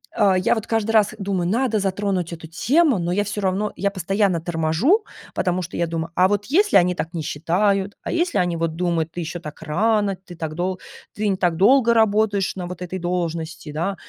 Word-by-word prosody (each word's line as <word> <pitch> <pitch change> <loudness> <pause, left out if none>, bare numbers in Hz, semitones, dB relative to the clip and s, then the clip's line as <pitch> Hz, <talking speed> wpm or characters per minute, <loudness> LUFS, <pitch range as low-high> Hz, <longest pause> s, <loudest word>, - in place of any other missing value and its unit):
а, 195 -3 +4
я 185 - +2
вот 220 -1 -4
каждый 225 -1 0
раз 215 -1 +3
думаю- 190 -3 -1
надо 230 0 +1
затронуть 190 -3 -1
эту 165 -1 -9
тему, 270 - +2
но 170 0 -1
я 205 +2 +1
всё 205 +1 -4
равно, 195 +2 0
я 200 +2 +1
постоянно 195 -1 0
торможу, 175 - +1 0.3
потому 180 0 0
что, 175 - -6
я 170 - 0
думаю, 165 0 -4
а 185 - +5
вот 205 +1 -1
если 400 - +2
они 180 -1 +3
так 165 -1 -4
не 165 - -3
считают, 190 +6 0
а - - -4
если 340 +1 0
они 175 -2 0
вот 165 -1 -2
думают: 165 -2 -1
"Ты 175 - -4
ещё 170 +2 -5
так 150 -2 -10
рано, 200 +5 +1
ты 185 -1 -13
так 160 -2 -5
долг 185 +2 -2 0.4
ты 210 +1 -1
не 190 - 0
так 175 -3 +1
долго 235 +5 +5
работаешь 210 -3 +2
на 180 - -4
вот 180 0 -8
этой 185 +1 -4
должности". 165 -2 -3
Да, 170 +6 -2
185 Hz, 215 wpm, -22 LUFS, 170-210 Hz, 0.4 s, а